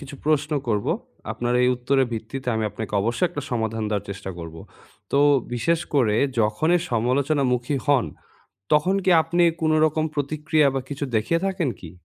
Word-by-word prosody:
কিছু 140 -1 -9
প্রশ্ন 150 0 +1 0.2
করব। 105 -2 0 0.5
আপনার 120 0 -2
এই 125 - +4
উত্তরের 130 +1 +1
ভিত্তিতে 120 +4 -5
আমি 110 0 -1
আপনাকে 110 -2 -7
অবশ্যই 115 - +1
একটা 145 - -6
সমাধান 115 -2 -2
দেওয়ার 105 -2 -2
চেষ্টা 100 -1 -6
করব। 80 -1 -8 0.6
তো 140 - +3 0.4
বিশেষ 165 +7 +1
করে 110 -7 +3 0.2
যখনই 155 +12 +2
সমালোচনামুখি 125 +2 +1
হন, 140 -5 +3 0.7
তখন 180 +6 +3
কি 190 - +2
আপনি 170 +2 +1 0.2
কোনো 155 0 +2
রকম 155 0 0
প্রতিক্রিয়া 150 +1 +1
বা 135 - -1
কিছু 145 0 -4
দেখিয়ে 165 +10 +1
থাকেন 185 -7 0
কি? 85 -3 -10
135 Hz, 160 wpm, -23 LUFS, 115-155 Hz, 0.7 s, এই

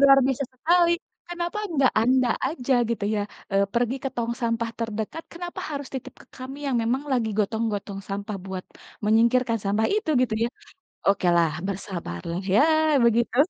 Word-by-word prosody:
Luar 275 -1 +8
biasa 270 +1 0
sekali, 340 +6 +3 0.4
kenapa 345 +3 -3
enggak 280 -7 +3
anda 255 +1 +3 0.2
aja 270 -3 -1 0.2
gitu 215 -3 -1
ya, 210 - 0 0.3
eee, 195 0 +4
pergi 240 +2 +1
ke - - +1
tong 235 0 -1
sampah 230 -1 0
terdekat. 225 +7 -3
Kenapa 350 +1 -6
harus 285 -2 -4
titip 265 - -6
ke - - -22
kami 265 +2 -7
yang 265 -3 +1
memang 245 +4 0
lagi 235 -3 +1
gotong-gotong 210 -2 -1
sampah 200 +1 -4
buat 190 -1 -5 0.4
menyingkirkan 230 +2 +3
sampah 205 +3 +2
itu, 425 -7 0
gitu 235 -3 0
ya. 235 - +1 0.6
Oke 195 -2 +2
lah 165 -2 +4 0.2
bersabarlah, 175 - -4
ya, 215 - +6 0.4
begitu. 235 0 +3
235 Hz, 160 wpm, -25 LUFS, 210-270 Hz, 0.6 s, Luar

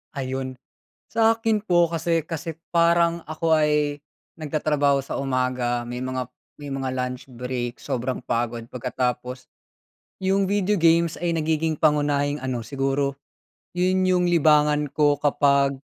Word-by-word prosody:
Ayun, 130 -1 -4 0.5
sa'kin 225 -1 +2
po 175 -4 +3
kasi 165 0 0
kasi 165 -1 -5
parang 170 0 +2
ako 160 +1 +1
ay 150 -1 +1 0.3
nagtatrabaho 150 -2 +1
sa 135 - -5
umaga 125 -2 -1
may 125 +1 -5
mga 130 -1 -3 0.3
may 145 - -8
mga 135 -1 -3
lunch 125 0 -4
break 125 0 -4
sobrang 125 +1 -3
pagod 115 0 -2
pagkatapos. 125 0 -3 0.7
'Yung 195 +1 +1
video 205 0 +1
games 170 -2 +3
ay 170 - +1
nagiging 160 -1 0
pangunahing 145 -2 +1
ano, 130 -2 -2
siguro 135 +3 -1 0.6
'yun 185 +1 +2
'yung 180 -1 +3
libangan 150 -3 +3
ko 145 0 +2
kapag 140 -1 +2
145 Hz, 125 wpm, -24 LUFS, 130-165 Hz, 0.7 s, po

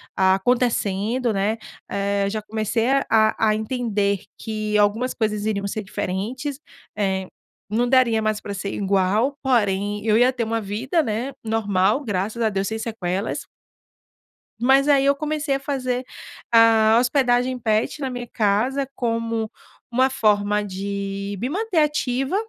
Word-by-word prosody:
acontecendo, 220 +3 +1
né, 205 +3 0 0.3
eh, 200 0 0
já 215 +1 -3
comecei 220 +2 -1 0.2
a 220 -1 +4
a 220 -1 +3
entender 215 -3 -1 0.2
que 215 -1 -2
algumas 215 +5 +2
coisas 210 -2 -1
iriam 200 -2 -1
ser 215 +2 -4
diferentes, 245 +10 -4 0.4
eh, 190 -2 -1 0.4
não 235 +4 +1
daria 245 -4 +4
mais 215 -1 0
pra 205 - -6
ser 200 0 -4
igual, 200 +7 +1
porém 205 -4 +1
eu 215 -1 +4
ia 245 +2 +5
ter 245 -3 -2
uma 225 0 -1
vida, 235 - -1
né, 235 +3 -3
normal 220 +2 +1
graças 205 +2 -2
a 225 - +3
Deus 195 -1 -1
sem 220 0 -3
sequelas. 200 -3 -3 1.1
Mas 270 +4 +4
aí 275 -1 +4
eu 280 0 +4
comecei 300 -1 -1
a - - -2
fazer 255 -3 -2 0.5
a 225 -1 +6
hospedagem 250 0 +2
pet 220 +4 0
na 270 - -1
minha 245 -1 -6
casa 230 +7 +1
como 230 -2 -2 0.4
uma 260 +2 +3
forma 210 -4 +2
de 200 0 -4
me 250 - -1
manter 400 +3 -2
ativa. 275 -1 0
220 Hz, 140 wpm, -22 LUFS, 205-250 Hz, 1.1 s, a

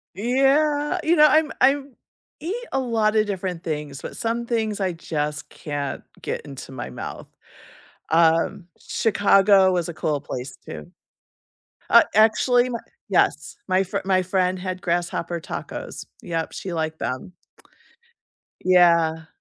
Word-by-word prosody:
Yeah, 285 - +2
you 335 +2 +3
know, 305 -1 +8
I'm 305 +1 +3
I'm 275 +1 +2 0.5
eat 335 +7 -3 0.2
a 270 - +1
lotta 220 -3 +2
different 185 -4 -4
things, 150 -4 -4
but - - -7
some 235 +1 -2
things 220 -3 -1
I 185 -2 0
just 150 -3 -4
can't 145 -2 -5 0.2
get - - -3
into 135 -2 -10
my 130 - -6
mouth. 60 - -7 0.9
Um, 165 +3 +3
Chicago 195 -3 +4
was 175 -2 0
a - - -5
cool 150 -2 -1
place 125 +1 -6
too. 75 -1 -9 1.0
Uh, - - +8
actually, 245 +3 +4
my 235 -2 -3 0.3
Yes, - - +1
my 185 +1 +3
fr 190 - -3
my 190 -1 +2
friend 185 0 0
had 185 0 -5
grasshopper 170 0 -2
tacos, - - -7 0.2
yep, 165 -2 -3
she 185 -3 -6
liked 160 -1 -3
them. 130 +9 -4 1.3
Yeah. 170 -3 +4
185 Hz, 135 wpm, -23 LUFS, 165-230 Hz, 1.3 s, know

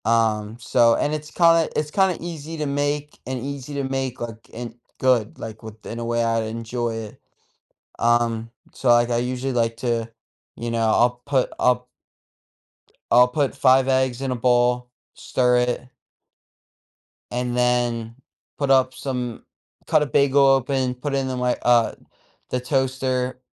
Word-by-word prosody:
Um, 110 -1 +1
so, 115 0 +3
and 145 - 0
it's 150 0 -5
kinda 165 -1 +4
it's 150 0 -1
kinda 190 -1 +2
easy 165 -1 -6
to 155 - -2
make 145 +1 -2
and 130 -1 -3
easy 140 +2 -6
to 140 - -1
make, 135 -1 -3
like, 115 -2 -7
and 120 0 -7 0.2
good, 125 -5 +2
like, 110 -1 -8
within 110 -1 -9
in 115 - -6
a 115 - -4
way 120 0 0
I'd 115 -1 +1
enjoy 115 +1 -3
it. 110 -2 -8 0.8
Um, 115 -1 +1 0.2
so, 130 - -1
like, 120 0 +5
I 120 - +1
usually 125 +2 -2
like 115 -1 0
to, 115 -1 -1 0.5
you 120 0 -4
know, 115 - -1
I'll 120 +2 +2
put 135 -3 +1
I'll 125 0 +2 1.2
I'll 125 +1 +7
put 140 +2 0
5 130 -1 +4
eggs 130 -1 +1
in 135 -1 -2
a - - 0
bowl, 125 0 +2 0.3
stir 125 -1 +1
it 125 +1 -1 1.4
and 125 0 -2
then 120 -2 0 0.4
put 140 -2 -1
up 130 -1 +4
some 125 -3 -4 0.4
cut 150 - +4
a - - -1
bagel 140 +1 +3
open, 135 -1 +2
put 135 +3 -4
it - - +1
in 130 -1 -3
my, 125 0 +1
uh, 120 -2 +4 0.6
the 125 - -1
toaster, 130 -1 -1
125 Hz, 160 wpm, -23 LUFS, 120-135 Hz, 1.4 s, I'll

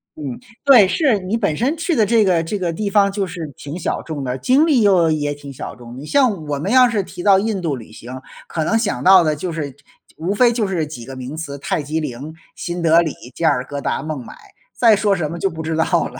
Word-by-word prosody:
嗯， 140 -5 -6 0.3
对， 250 -9 +7
是， 265 - +2
你 190 +3 -3
本 200 -10 -1
身 270 +7 0
去 330 +1 -1
的 220 -3 +3
这 225 +1 +3
个 175 -4 +2
这 200 +5 -3
个 175 -2 -1
地 200 +5 -3
方 200 0 +3
就 200 -1 -2
是 165 -5 -7
挺 145 +5 -7
小 165 - -2
众 150 -4 -5
的， 125 0 -3
经 275 - +3
历 265 -7 +3
又 185 -5 +4
也 145 -2 0
挺 145 -1 -10
小 135 - -7
众。 120 0 -11
你 140 - -8
像 225 - +1
我 145 -1 -3
们 190 +8 -2
要 255 0 +6
是 225 -4 0
提 180 -1 -9
到 195 -2 +5
印 210 -1 -1
度 155 -4 -1
旅 115 -4 -11
行， 125 +4 -9 0.3
可 160 - -2
能 225 +8 +1
想 225 -3 -2
到 185 -1 +7
的 155 -1 +1
就 170 +4 -4
是 155 -3 -4
这 130 - -25 0.4
无 170 +5 -2
非 240 +2 +4
就 225 -4 0
是 175 -5 -1
几 145 -6 -9
个 135 +3 -9
名 130 +3 -7
词： 150 -3 -6
泰 145 +2 -2
姬 155 +3 -3
陵、 145 +1 -6 0.2
新 175 0 -5
德 165 +1 +5
里、 160 -3 -2 0.2
加 165 -2 +1
尔 130 -3 0
各 140 +1 -6
答、 - - -2
孟 155 -4 -5
买， 115 - -11 0.4
再 230 -3 +6
说 205 -1 +1
什 160 -4 -3
么 170 - -6
就 195 - +1
不 160 -1 -7
知 160 0 -2
道 160 - +2 0.2
了。 130 - -11
165 Hz, 280 characters per minute, -19 LUFS, 145-205 Hz, 0.4 s, 对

